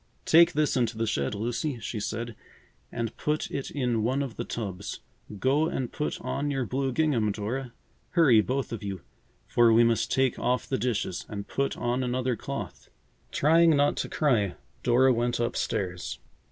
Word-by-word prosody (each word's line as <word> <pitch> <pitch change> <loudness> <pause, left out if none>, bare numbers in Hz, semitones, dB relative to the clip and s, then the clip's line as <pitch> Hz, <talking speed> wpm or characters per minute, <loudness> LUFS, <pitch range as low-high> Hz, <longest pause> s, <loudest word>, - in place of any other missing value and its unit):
"Take 170 +2 +6
this 155 -1 +1
into 120 -3 0
the 115 - 0
shed, 70 -4 -1
Lucy," 120 +5 -2
she 110 0 -4
said, 115 +2 -4 0.6
"and 115 -2 -3
put 150 0 -1
it 140 - -3
in 125 -5 0
one 130 +5 +1
of 130 -5 -6
the 120 - -3
tubs. 100 -5 -5 0.4
Go 140 +8 +2
and 130 -6 -3
put 150 - -3
on 145 +1 -2
your 135 -3 -1
blue 135 +2 -1
gingham, 125 -7 +1
Dora. 120 +5 -4 0.4
Hurry, 145 -11 +6
both 130 +4 -2
of 115 - -5
you, 100 -3 -5 0.4
for 120 -1 +4
we 115 +1 +6
must 115 -1 +1
take 130 -1 +2
off 125 0 0
the 130 - -1
dishes 115 -7 -2
and 100 -2 -6
put 140 0 -1
on 120 +1 0
another 125 0 0
cloth." - - -6 0.4
Trying 165 +2 +5
not 145 0 +3
to - - -2
cry, 115 - +1 0.3
Dora 130 +2 +4
went 120 +1 0
up 120 0 -1
stairs. 90 -2 -2
125 Hz, 175 wpm, -27 LUFS, 110-140 Hz, 0.6 s, Take